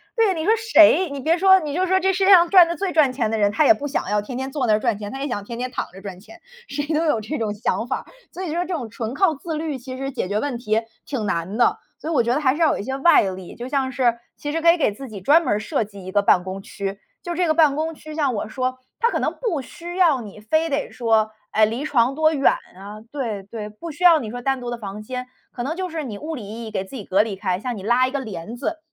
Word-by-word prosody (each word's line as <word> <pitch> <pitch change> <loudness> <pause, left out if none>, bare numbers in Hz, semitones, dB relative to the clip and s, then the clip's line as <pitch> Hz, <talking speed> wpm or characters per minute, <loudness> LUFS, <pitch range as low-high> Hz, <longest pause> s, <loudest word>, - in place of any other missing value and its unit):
对， 445 -5 +3
你 320 -1 -3
说 440 - +5
谁 375 -5 +5
你 280 -1 -5
别 325 +5 +2
说 380 +1 +6
你 300 -4 -5
就 370 +3 +1
说 375 +1 +2
这 385 +1 +2
世 380 +1 +1
界 395 - +6
上 345 -3 +7
赚 360 -3 +8
得 340 - -2
最 385 +2 -2
赚 300 -5 +4
钱 235 -4 0
的 225 - 0
人， 205 -1 +2
他 300 +8 +2
也 335 - +8
不 290 -1 -5
想 280 - -2
要 210 0 +1
天 245 +4 -7
天 265 +1 -4
坐 275 -3 -1
那 215 - +4
儿 210 - +3
赚 230 -3 0
钱， 205 -1 -6
他 270 +1 -6
也 285 - -2
想 205 -6 -3
天 230 +3 -7
天 255 +1 -2
躺 - - -3
着 195 - -11
赚 190 -2 -8
钱， 335 - -15 0.3
谁 290 +1 -3
都 320 +2 +1
有 235 -8 +2
这 295 +8 -4
种 215 -2 -2
想 225 +2 -2
法， - - -3 0.3
所 370 - -6
以 325 -4 -3
说 345 - 0
这 365 - -4
种 255 -9 -4
纯 225 +1 -5
靠 365 +1 +3
自 320 +3 -5
律 305 -2 -3
其 255 +1 -8
实 270 +1 -4
解 220 - -3
决 205 +2 -1
问 270 0 -2
题 225 -2 0 0.2
挺 255 -7 -3
难 185 +2 -2
的。 240 - +3 0.3
所 315 - -3
以 - - -1
我 285 - +4
觉 235 +1 +1
得 300 - 0
还 260 -3 +3
是 310 - -4
要 320 - +4
有 - - -4
一 - - -4
些 265 +3 -3
外 340 +5 +6
力， 185 -2 -5
就 245 +2 -7
像 270 -2 0
是 240 -2 +1 0.2
其 290 - -5
实 330 - -2
可 335 +1 +6
以 - - 0
给 290 - +2
自 265 +7 -9
己 210 -5 -9
专 300 - +5
门 330 - 0
儿 205 - 0
设 215 0 -1
计 200 -2 -12
一 185 - -6
个 205 +1 +3
办 185 -2 +4
公 190 +1 -6
区， 195 0 -5 0.2
就 345 - -4
这 355 +1 +1
个 310 - +3
办 305 -3 +4
公 320 0 -2
区 310 0 -10
像 290 -5 0
我 210 - -3
说 255 +2 -2 0.2
它 470 - +3
可 - - -1
能 - - -1
不 360 - -1
需 345 +7 -9
要 335 -8 +4
你 210 -2 -10
非 315 +9 +1
得 285 0 -2
说， 220 -2 +1 0.2
哎， 215 - +3
离 235 +7 -3
床 255 -3 +2
多 315 +1 +3
远 275 -2 +4 0.2
啊 200 +3 -9
对 230 -9 -4
对， 210 +1 -7
不 215 +11 -9
需 320 +3 -7
要 340 -3 +7
你 230 -6 -5
说 245 +2 -6
单 270 0 0
独 245 - -5
的 240 - -3
房 205 -1 -7
间， 250 +3 -6 0.3
可 240 - -4
能 315 +6 -3
就 370 -1 -3
是 320 -2 -4
你 225 -7 -6
物 315 +7 -5
理 230 -7 -7
意 225 +3 -7
义 - - -8
给 200 - -2
自 195 +8 -9
己 210 - -8
隔 195 +2 +3
离 210 -3 -5
开， 185 -2 -1
像 240 +3 -4
你 190 - -8
拉 240 +4 +3
一 255 - -3
个 280 - -2
帘 215 -2 -7
子， 320 +6 -3
260 Hz, 330 characters per minute, -22 LUFS, 215-315 Hz, 0.3 s, 赚